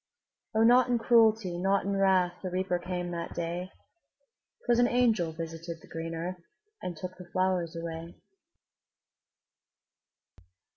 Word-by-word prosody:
O, 220 - +4
not 245 +2 +6
in 245 - +3
cruelty, 220 -6 +3
not 195 +2 +2
in 200 0 0
wrath, 190 -2 +3
The 185 - -3
Reaper 185 0 -1
came 180 0 -4
that 170 -1 -5
day; 175 +2 -3 1.0
'Twas 240 -1 +3
an 245 - +5
angel 230 -9 +2
visited 165 +1 -6
the - - -17
green 165 0 -5
earth, 175 +2 -5 0.4
And 175 -3 -5
took 185 +3 -7
the 180 -1 -12
flowers 185 -3 0
away. 165 0 -6
180 Hz, 135 wpm, -29 LUFS, 170-200 Hz, 1.0 s, not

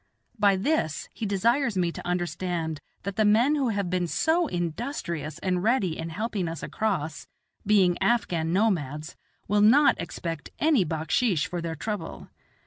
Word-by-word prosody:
By 200 -1 +5
this 190 - -1
he 220 - -4
desires 235 +4 +1
me 175 -2 +1
to 175 - -8
understand 175 -3 -2 0.2
that 200 0 -5
the 215 - +4
men 225 +7 +4
who 275 -5 +1
have 200 -4 -1
been 180 -1 0
so 325 - +1
industrious 170 - -3
and 180 -2 0
ready 205 -6 +1
in 165 0 -5
helping 200 +1 -2
us 165 0 -5
across, 160 -9 -2 0.4
being 190 -4 +4
Afghan 170 -9 +1
nomads, 165 -6 0 0.3
will 205 +1 +2
not 265 +8 +5
expect 165 -1 -5
any 300 -9 +3
backsheesh 160 +3 0
for 175 -1 -4
their 165 -1 -4
trouble. 210 +6 -5
185 Hz, 150 wpm, -26 LUFS, 165-220 Hz, 0.4 s, By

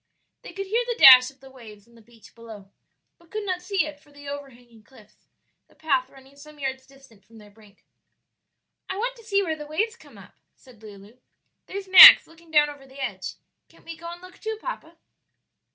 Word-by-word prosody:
They - - -12
could 390 0 -7
hear 450 +5 -2
the 480 -1 -4
dash 255 - +8
of 270 -1 -23
the 270 0 -16
waves 220 -5 -16
on 235 - -25
the 230 - -20
beach 230 0 -21
below, 220 -4 -14 0.5
but 340 -1 -26
could 430 +2 -6
not 365 -2 -4
see 380 -3 -2
it 300 -1 -10
for 290 - -26
the 285 0 -15
over 285 0 -8
hanging 240 -3 -22
cliffs, 215 -2 -23 0.4
the - - -28
path 270 -5 -2
running 270 0 -20
some 300 +1 -16
yards 265 -2 -6
distant 270 -7 -22
from 230 - -21
their 210 -1 -17
brink. 210 -1 -24 1.0
"I 380 - -5
want - - -4
to 460 - -17
see 400 -2 -1
where 320 -4 -4
the 300 -1 -11
waves 435 +10 -3
come - - -20
up," - - -18 0.2
said 250 -5 -21
Lulu; 210 +2 -16 0.5
"there's 390 0 -8
Max 375 -1 +10
looking 330 0 -22
down 300 -2 +3
over 285 -2 -13
the 265 +1 -16
edge; 265 - -6 0.3
can't - - -25
we 335 - -9
go 335 +1 -12
and 350 +1 -13
look 365 - -16
too, 440 0 -6
papa?" 335 -9 -9
280 Hz, 215 wpm, -23 LUFS, 235-350 Hz, 1.0 s, Max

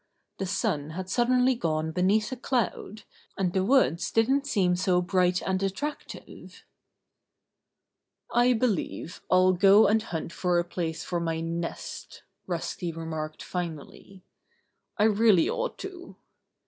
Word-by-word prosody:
The 195 - -2
sun 150 -6 -1
had 185 0 -5
suddenly 250 +3 +3
gone 160 -8 -2
beneath 195 +6 +1
a - - -2
cloud, 230 -4 -2 0.3
and 180 -2 0
the 190 - +1
woods 190 -8 +2
didn't 265 +5 +2
seem 185 -9 +2
so 180 0 +2
bright 180 0 +1
and 190 0 -1
attractive. 240 +11 -6 1.7
"I 245 +1 +4
believe 220 -7 -2
I'll 185 0 +5
go 195 +4 +6
and 220 +1 +3
hunt 170 -4 -5
for 180 -1 0
a 175 - +2
place 165 -2 -4
for 175 - -2
my 165 -1 -2
nest," 165 +1 -6 0.2
Rusty 175 0 -3
remarked 160 -1 -6
finally. 175 +2 -7 0.7
"I 210 - +2
really 215 -4 +4
ought - - -2
to." 360 -2 -10
185 Hz, 130 wpm, -27 LUFS, 170-220 Hz, 1.7 s, go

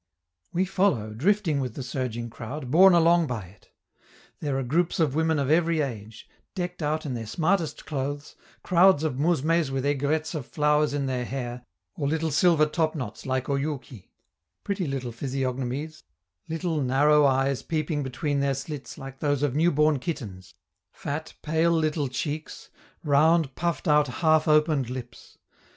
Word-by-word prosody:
We 185 +2 +1
follow, 180 - 0
drifting 165 - +1
with 125 -4 -3
the 135 - -5
surging 120 -2 -4
crowd, 125 +3 -7
borne 185 +4 +7
along 170 0 +4
by 120 -6 -4
it. 95 +2 -20 0.7
There 145 -3 -2
are 135 - -1
groups 165 +9 0
of 155 -5 +2
women 160 +1 +1
of 140 0 0
every 165 0 +3
age, 110 -5 -6 0.3
decked 180 -2 -4
out 155 +1 -1
in 135 - -3
their 115 -2 -5
smartest 165 - -1
clothes, 145 0 -4 0.3
crowds 180 -3 +5
of 145 -5 -2
mousmes 165 0 +2
with 135 0 -2
aigrettes 145 +3 0
of 150 -6 -5
flowers 150 -1 +1
in 140 -1 -1
their 130 -2 -1
hair, 125 -1 -5 0.3
or 140 - -2
little 160 +1 0
silver 155 +1 +4
topknots 155 -4 -3
like 130 -1 -1
Oyouki 140 -6 -4 0.5
pretty 195 -4 -2
little 130 -3 -3
physiognomies, 135 +4 -3 0.5
little, 165 -1 -1
narrow 145 +3 +4
eyes 135 0 +1
peeping 155 -2 -2
between 140 +2 -2
their 140 0 +1
slits 140 +1 -7
like 135 0 -9
those 145 -2 0
of 145 -4 +1
new 160 +4 +3
born 150 -2 +2
kittens, 100 - -6 0.4
fat, 155 +2 -6
pale, 160 +2 +2
little 155 -3 +1
cheeks, 145 +4 -5 0.3
round, 155 0 +3
puffed 170 +2 -2
out, 150 -1 +4
half 155 +4 +2
opened 150 -4 +3
lips. 125 -2 -9
145 Hz, 155 wpm, -26 LUFS, 130-160 Hz, 0.7 s, borne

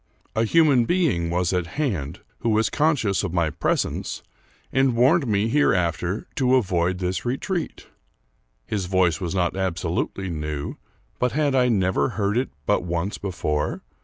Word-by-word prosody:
A 110 +1 +2
human 140 -3 +4
being 135 - +1
was 90 +1 0
at 90 -2 0
hand, 95 - -2 0.2
who 115 - -1
was 110 0 +2
conscious 145 -11 +1
of 95 -3 -3
my 85 -3 +1
presence, 80 +1 -2 0.5
and 135 -2 +3
warned 130 +4 +4
me 105 0 +1
hereafter 95 - +1
to 130 -1 +3
avoid 90 -6 +1
this 90 0 -2
re 125 +2 -1
treat. 175 -1 -4 0.8
His 100 -4 -2
voice 90 -3 +2
was 90 0 -3
not 90 -1 +1
absolutely 90 0 -2
new, 75 -2 -4 0.4
but 125 -2 +1
had 145 -1 +1
I 125 -2 +4
never 95 -9 +2
heard 100 0 +1
it 125 +2 0 0.2
but - - +2
once 85 +3 -3
before 75 -6 -2
95 Hz, 155 wpm, -24 LUFS, 85-125 Hz, 0.8 s, human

